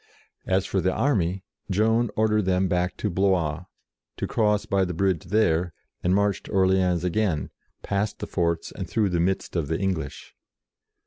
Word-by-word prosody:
As 95 0 +2
for 95 - 0
the 95 +2 +2
army, 95 -8 0 0.3
Joan 110 +4 +2
ordered 105 -2 +2
them 95 0 +2
back 90 0 -1
to 105 - -1
Blois, 90 -4 +1 0.5
to - - -2
cross 105 -2 +1
by 100 0 +1
the 90 -2 -3
bridge 95 -3 0
there, 90 -3 +1 0.3
and 90 +1 +2
march 100 -1 +1
to - - -12
Orleans 95 -2 +2
again, 90 -4 0 0.3
past 100 +1 -1
the - - -5
forts 85 -2 -1
and 95 - -6
through 105 -3 +1
the 85 -1 0
midst 95 +2 -1
of 80 -5 0
the 80 +2 -1
English. 90 -8 -3
95 Hz, 170 wpm, -25 LUFS, 85-100 Hz, 0.5 s, As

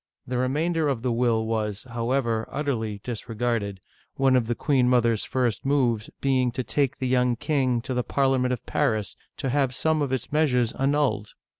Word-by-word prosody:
The 125 0 -2
remainder 155 +5 +1
of 130 -5 -1
the 125 - +1
will 115 -2 +1
was, 110 -2 -2
however, 115 -1 -1
utterly 115 -8 -2
disregarded, 115 -3 -2 0.4
one 135 -1 +3
of 120 -3 +2
the 120 - 0
queen 130 -2 +2
mother's 115 -3 +3
first 125 -4 -1
moves 125 -6 +1
being 130 -2 +2
to 130 - -2
take 140 0 0
the 130 - -2
young 125 -1 +2
king 130 -3 0
to 130 - -4
the 125 0 0
Parliament 130 -2 +1
of 125 - -3
Paris 110 -9 0 0.2
to 135 - -2
have 135 -1 +1
some 160 +1 +1
of 140 -3 -1
its 130 - -3
meas 155 -3 +3
ures 120 0 0
annulled. 135 -7 +1
125 Hz, 180 wpm, -25 LUFS, 115-135 Hz, 0.4 s, one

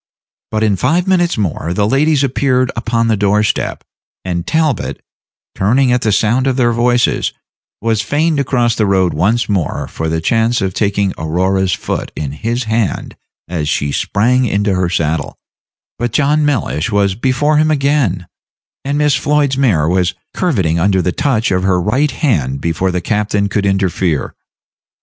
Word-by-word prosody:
But 110 0 -1
in 105 -3 +2
five 165 - +1
minutes 175 -4 +2
more 85 -4 -2
the 105 +1 +1
ladies 145 +3 +2
appeared 130 -1 +1
upon 115 0 0
the 110 - +2
door 105 +1 +2
step, - - -2 0.4
and 85 -2 -3
Talbot, 160 -4 0 0.5
turning 125 +6 +2
at 125 0 +2
the 110 - +1
sound 115 +6 +2
of 130 - +1
their 120 -2 +3
voices, 120 +1 +1 0.5
was 115 -2 +1
fain 150 +9 0
to 140 - +1
cross 120 -3 +1
the 110 -1 0
road 95 -2 +2
once 105 +10 +1
more 95 -6 -2
for 80 - -4
the 80 0 -1
chance 115 +7 +1
of 95 -1 -2
taking 100 -1 0
Aurora's 90 +4 0
foot - - -4
in 75 -3 -4
his 115 - -2
hand 110 -2 -2 0.3
as 80 -3 -3
she 70 -2 -1
sprang 125 - +1
into 100 -1 0
her 90 -1 0
saddle; 80 -3 -2 0.6
but 120 0 -1
John 150 +4 +2
Mellish 110 - -1
was 100 -2 +2
before 135 +7 +1
him 155 +1 +3
again, 140 - +1 0.6
and 140 +1 -1
Miss 150 -2 +2
Floyd's 145 0 +1
mare 105 - +2
was 90 +1 +1 0.2
curveting 95 - 0
under 95 +1 +2
the 90 - 0
touch 120 -1 0
of 90 -1 +1
her 95 -1 +1
right 125 +11 +1
hand 80 - -1
before 85 +3 -1
the 90 0 -2
captain 105 +1 0
could 100 0 0
interfere. 95 -5 0
110 Hz, 170 wpm, -15 LUFS, 95-130 Hz, 0.6 s, their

